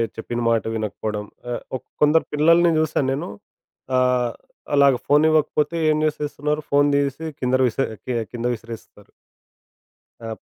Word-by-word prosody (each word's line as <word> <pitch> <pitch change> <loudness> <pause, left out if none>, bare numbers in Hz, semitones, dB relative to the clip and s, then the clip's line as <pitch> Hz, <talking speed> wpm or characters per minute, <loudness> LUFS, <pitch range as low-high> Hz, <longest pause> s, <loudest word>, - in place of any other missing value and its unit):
చెప్పిన 120 +1 -4
మాట 115 -1 +2
వినకపోడం. 105 -1 -3 0.2
ఆహ్, 120 - -3 0.2
ఒక్ - - -23 0.2
కొందరి 150 +2 +4
పిల్లల్ని 165 +3 +4
జూసాను 155 -3 +1
నేను 135 - -4 0.7
ఆహ్, 125 -1 +2 0.4
అలాగా 140 -2 +5
ఫోన్ 145 +2 +4
ఇవ్వకపోతే 155 +1 +1
ఏం 155 - +3
జేసేస్తున్నారు? 150 0 -2
ఫోన్ 145 0 +4
దీసి 140 +2 -1
కిందర 130 +1 +1
విసే 135 +3 -1 0.2
కి 125 - -2 0.2
కింద 120 -1 -5
విసిరేస్తరు. 115 -2 -11 1.1
ఆ! 115 -1 -5
140 Hz, 130 wpm, -22 LUFS, 120-150 Hz, 1.1 s, అలాగా